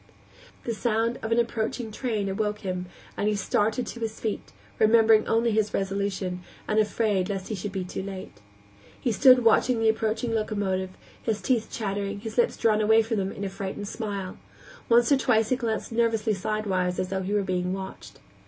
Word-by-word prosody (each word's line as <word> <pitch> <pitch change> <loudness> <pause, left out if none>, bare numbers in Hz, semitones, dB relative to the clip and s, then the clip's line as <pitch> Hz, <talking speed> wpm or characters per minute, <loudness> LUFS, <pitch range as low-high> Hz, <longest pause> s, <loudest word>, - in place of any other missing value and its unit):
The 235 - -2
sound 230 +1 0
of 220 - -4
an 230 - +3
approaching 230 0 -1
train 215 -3 -2
awoke 210 +2 -2
him, 185 -2 -3 0.3
and 205 - -1
he 210 - +2
started 215 +4 0
to 235 - -7
his 225 -1 -4
feet, 220 -2 -4 0.3
remembering 220 0 +5
only 230 +1 +2
his 215 -1 +1
resolution, 195 -2 -2 0.3
and 215 - +2
afraid 210 -3 +1
lest 195 -2 -4
he - - -2
should 205 0 -4
be 190 -1 -3
too 180 - -5
late. 190 - -8 0.6
He 240 - 0
stood 255 +3 +6
watching 230 +1 +4
the 225 0 +3
approaching 220 +1 0
locomotive, 200 -4 -1 0.3
his 220 -2 -1
teeth 240 -4 0
chattering, 200 -1 -3
his 225 0 -6
lips 240 - +2
drawn 215 -1 +3
away 220 +1 +5
from 225 0 -2
them 195 -1 -1
in 200 - -6
a 195 - -2
frightened 195 +1 -5
smile; 200 -4 -5 0.5
once 235 +1 +5
or 280 - +6
twice 225 -4 +2
he 255 - +3
glanced 230 -3 -3
nervously 225 -1 +1
sidewise, 190 -3 -1
as 185 - -2
though 190 0 -1
he 195 +3 -2
were 205 - +2
being 180 -1 -1
watched. 190 - -7
215 Hz, 190 wpm, -26 LUFS, 195-225 Hz, 0.6 s, stood